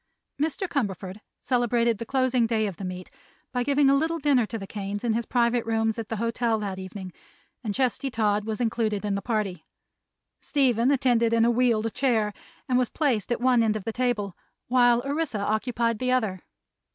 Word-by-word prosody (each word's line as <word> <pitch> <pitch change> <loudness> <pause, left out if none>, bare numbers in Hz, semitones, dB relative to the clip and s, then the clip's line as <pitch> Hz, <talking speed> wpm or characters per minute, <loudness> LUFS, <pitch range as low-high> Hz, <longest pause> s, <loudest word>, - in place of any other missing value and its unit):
Mr. 320 +5 0
Cumberford 200 - -3 0.2
celebrated 240 -3 +1
the 230 - -5
closing 255 -3 +2
day 220 -2 +1
of 195 -5 -4
the - - -7
meet 185 0 -6 0.4
by 250 - -1
giving 280 +2 +3
a 275 - +5
little 320 +4 +1
dinner 275 -7 +2
to 225 - -4
the 195 - -6
Kanes 205 +1 -5
in 235 -2 +1
his 230 +1 -2
private 240 -1 +2
rooms 225 0 0
at 225 - -5
the 225 - -2
hotel 230 +1 0
that 200 -3 -4
evening, 185 -1 -8 0.5
and 215 - -2
Chesty 270 +1 0
Todd 210 -4 +1
was 220 +1 -4
included 225 -3 0
in 205 - 0
the 200 - -1
party. 200 -6 -2 0.8
Stephen 255 -4 +2
attended 245 -4 +2
in 230 0 +4
a 240 - +4
wheeled 230 -2 +1
chair 225 -6 +1 0.3
and 250 -1 +2
was 250 - +1
placed 245 - 0
at 240 - 0
one 250 -1 +4
end 220 -1 +2
of 215 - -4
the 225 - -4
table, 230 -6 -1 0.3
while 245 -1 +4
Orissa 285 -3 -1
occupied 230 +2 0
the 255 0 0
other. 220 -7 0
230 Hz, 190 wpm, -26 LUFS, 210-250 Hz, 0.8 s, a